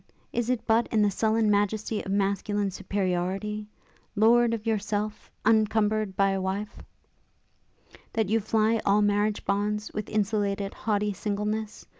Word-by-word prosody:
Is 240 0 -1
it 250 -2 -1
but 225 +1 +3
in 215 -2 +2
the 205 - +3
sullen 220 +1 +2
majesty 210 +1 0
of 195 - -5
masculine 200 0 0
superiority, 195 +2 -2 0.5
'Lord 230 +2 +5
of 230 -1 -3
yourself, 210 -1 -2 0.2
uncumber'd 215 -2 +2
by 195 0 +3
a 195 0 -1
wife,' 195 +3 -4 1.3
that 220 -2 +1
you 225 +3 +2
fly 220 +1 +1
all 205 +1 +3
marriage 205 +1 +1
bonds, 210 +1 -1
with 210 - -4
insulated, 200 -1 -1
haughty 210 -1 -1
singleness? 210 +2 -3
210 Hz, 135 wpm, -27 LUFS, 200-220 Hz, 1.3 s, Lord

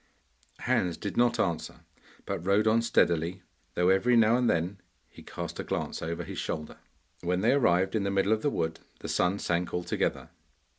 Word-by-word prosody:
Hans 90 -2 0
did 100 - -5
not 120 0 +2
answer, 85 -4 -2 0.4
but - - -3
rode 100 +3 +3
on 110 +1 +4
steadily, 85 -5 +1 0.3
though 90 +1 +3
every 105 +6 +4
now 115 0 +5
and 125 -1 +2
then 90 +3 -1 0.3
he - - -15
cast - - -7
a - - -2
glance - - -3
over 85 +1 -3
his - - -6
shoulder. 75 0 -4 0.4
When 90 +1 0
they 115 - +4
arrived 95 -8 +2
in 110 - +1
the 100 - -1
middle 100 +2 +2
of 110 - -1
the 145 - +1
wood 80 -10 -2 0.2
the - - -6
sun 90 +3 +1
sank 85 -2 -1
altogether. 90 0 -2
95 Hz, 185 wpm, -28 LUFS, 85-110 Hz, 0.4 s, now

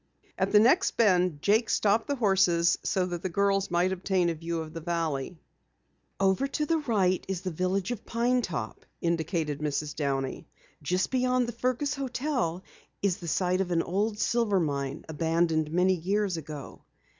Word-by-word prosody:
At - - 0
the 210 - +7
next 265 - +3
bend 180 -8 +3
Jake 220 +3 +3
stopped 215 +2 +2
the 285 - 0
horses 190 -7 +3
so 185 -1 0
that 175 -2 -4
the 185 - -2
girls 195 +2 +1
might 175 +2 +2
obtain 185 -1 +1
a - - -2
view 165 +1 -4
of 160 -1 -7
the 165 - -6
valley. 165 -2 -2 0.8
"Over 195 +7 +2
to 300 +2 -2
the 325 +1 +1
right 200 - +1
is 190 -2 -3
the 185 -1 -3
village 185 +4 -1
of 235 -3 -5
Pine 245 +2 +1
Top," 140 - -5 0.2
indicated 165 -3 -1
Mrs. 150 0 -2
Downey. 135 -2 -2 0.3
"Just 180 +5 0
beyond 255 -1 +1
the - - -3
Fergus 255 +4 -1
hotel 255 - -2 0.4
is 195 -3 +2
the 170 - -8
site 185 +2 +1
of 185 - -2
an 170 -2 +1
old 205 +4 -1
silver 220 -4 +1
mine, 140 -3 -2
abandoned 160 0 0
many 180 +3 +3
years 190 +2 0
ago. 150 -3 -8
185 Hz, 170 wpm, -28 LUFS, 165-210 Hz, 0.8 s, the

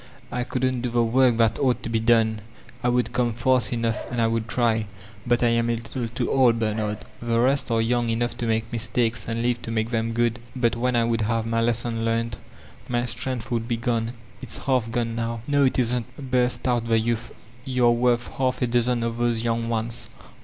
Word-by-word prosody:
I 125 - -1
couldn't 130 0 -1
do 125 - -1
the 120 0 +2
work 120 +1 +3
that 115 -1 +2
ought 130 -3 +1
to - - -4
be 115 0 +1
done. 110 -1 +3 0.4
I 125 - +3
would 125 0 0
come 120 -2 +1
fast 125 -1 +2
enough 115 -2 -2
and 120 - -3
I 115 - +3
wouM 115 0 0
try. 115 -2 +1 0.4
But 120 0 +2
Vm 115 -1 +2
a 120 - +2
little 115 +1 -4
too 120 +1 -2
old, 125 -4 +4
Bernard. 110 -1 -2 0.2
The 115 -1 0
rest 135 +3 +2
are 115 -1 +2
young 120 0 +1
enough 120 +2 -1
to 120 - -2
make 110 0 -1
mistakes 115 0 0
and 115 +1 -2
live 120 0 0
to - - -6
make 115 0 -1
them 115 -1 -1
good; 120 +1 +1 0.2
but 120 -2 +1
when 125 +1 0
I 120 - +3
would 115 -1 0
have 110 +1 0
my 115 0 0
lesson 115 0 0
learned, 115 -1 -1 0.5
my 120 0 0
strength 130 +1 -2
would 115 -1 -1
be 120 -1 -1
gone. 115 0 -1 0.3
It's - - -4
half 125 -4 +1
gone 115 -1 -1
now." 115 0 -3
•*No, 145 -1 +3
it 130 - +1
isn't," 125 0 0
burst 125 -1 +2
out 120 -2 +1
the 115 -1 +3
youth. 115 +1 -1 0.4
'Tou're 125 -2 +3
worth 120 0 +2
half 130 -1 -1
a - - +4
dozen 120 0 +1
of 115 0 -2
those 120 -1 0
young 115 0 -1
ones. 115 0 -1
115 Hz, 215 wpm, -24 LUFS, 115-125 Hz, 0.5 s, old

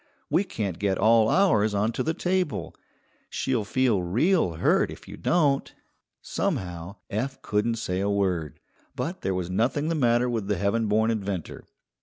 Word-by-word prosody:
We 190 - +3
can't 100 - -4
get 100 -2 +1
all 110 +1 +4
ours 110 - +3
onto 105 +3 0
the 160 +1 -1
table. 175 - -1 0.5
She'll 125 -5 -1
feel 115 -2 +1
real 120 - +2
hurt 80 - +2
if - - -11
you - - -8
don't." 145 -6 +1 0.5
Somehow 90 +1 -3 0.2
Eph 130 +6 -2
couldn't 110 +2 0
say 95 -5 -2
a 100 +1 0
word, 90 -7 -1 0.4
but 175 +4 -4
there 95 - -1
was 90 -1 -3
nothing 125 - 0
the - - +1
matter 120 -4 +2
with 115 -5 -2
the 105 - 0
heaven 110 +3 +1
born 110 +2 +2
inventor. 100 -6 -4
110 Hz, 160 wpm, -26 LUFS, 95-130 Hz, 0.5 s, all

